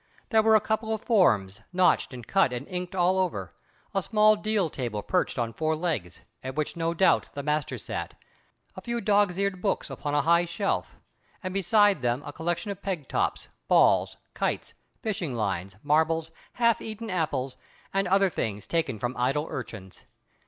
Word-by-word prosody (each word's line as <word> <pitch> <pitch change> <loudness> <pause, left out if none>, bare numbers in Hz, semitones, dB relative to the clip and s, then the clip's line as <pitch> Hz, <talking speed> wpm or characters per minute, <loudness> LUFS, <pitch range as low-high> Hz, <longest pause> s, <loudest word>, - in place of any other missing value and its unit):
There 220 -3 +5
were 220 0 +5
a - - +7
couple 220 0 -1
of 220 -1 -2
forms, 110 - +3
notched 180 -4 +3
and 125 -3 -8
cut 195 - +3
and 125 +3 -5
inked 180 0 -5
all 185 +1 +3
over; 100 - -2 0.4
a 195 - +1
small 215 +2 +4
deal 210 -3 0
desk 125 -6 -4
perched 180 -6 +1
on 115 -2 -1
four 155 +3 0
legs, 155 - -3 0.2
at 130 0 -5
which 155 -1 -2
no 165 0 -1
doubt 190 +3 +3
the 140 - -4
master 150 0 -1
sat; - - -5 0.6
a - - -8
few 235 0 -2
dog's 205 -4 +2
eared 200 -2 -1
books 200 - -1
upon 145 -1 -3
a 145 - +3
high 170 +2 +4
shelf; 170 +4 -2 0.5
and 185 0 -3
beside 195 - +3
them 120 +3 0
a 145 - -7
collection 175 +6 -2
of 200 0 -7
peg 180 -9 -3
tops, - - -1 0.2
balls, - - +4 0.2
kites, - - -2 0.3
fishing 185 - -2
lines, 95 -4 -2
marbles, 160 +2 +2 0.2
half 235 -2 +2
eaten 220 0 -6
apples, 145 -7 -1 0.4
and 195 0 +1
other 195 0 +3
things 105 -7 -3
taken 160 -8 -1
from 120 +4 -3
idle 135 +5 +1
urchins. 105 -7 -7
170 Hz, 175 wpm, -27 LUFS, 130-195 Hz, 0.6 s, a